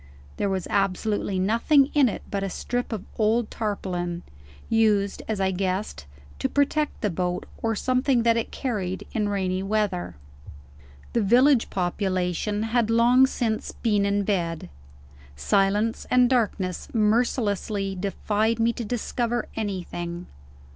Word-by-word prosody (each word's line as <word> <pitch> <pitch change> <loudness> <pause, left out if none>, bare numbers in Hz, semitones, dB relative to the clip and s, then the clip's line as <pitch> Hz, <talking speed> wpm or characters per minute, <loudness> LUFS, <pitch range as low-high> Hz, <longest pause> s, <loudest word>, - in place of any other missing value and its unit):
There 200 - 0
was 190 -2 -2
absolutely 195 0 0
nothing 235 - +3
in 280 -4 +5
it - - -6
but 200 - -1
a 195 - -2
strip 245 +7 -3
of 215 -4 -4
old 220 +1 +2
tarpaulin 180 -5 -3 0.4
used, 210 -3 +2
as 220 -2 -2
I 190 0 +1
guessed, 185 - -3 0.3
to - - 0
protect 285 +1 0
the 210 -5 0
boat, 180 +1 -2 0.2
or 225 -1 0
something 255 +1 +1
that 230 0 +4
it 230 - -1
carried, 195 -8 -3
in 210 -2 0
rainy 190 -2 -1
weather. 195 - -1 1.0
The 235 - +2
village 245 +5 +4
population 185 +2 -1
had 225 0 +1
long 240 +3 +5
since 225 -4 -2
been 210 -4 +1
in 200 0 +1
bed. 170 - -2 0.7
Silence 200 - +1
and 250 0 +5
darkness 210 -7 0
mercilessly 210 -3 +1
defied 205 +3 -1
me 230 +1 +2
to 235 - -5
discover 240 +1 -2
anything. 180 -4 -4
210 Hz, 135 wpm, -25 LUFS, 190-230 Hz, 1.0 s, in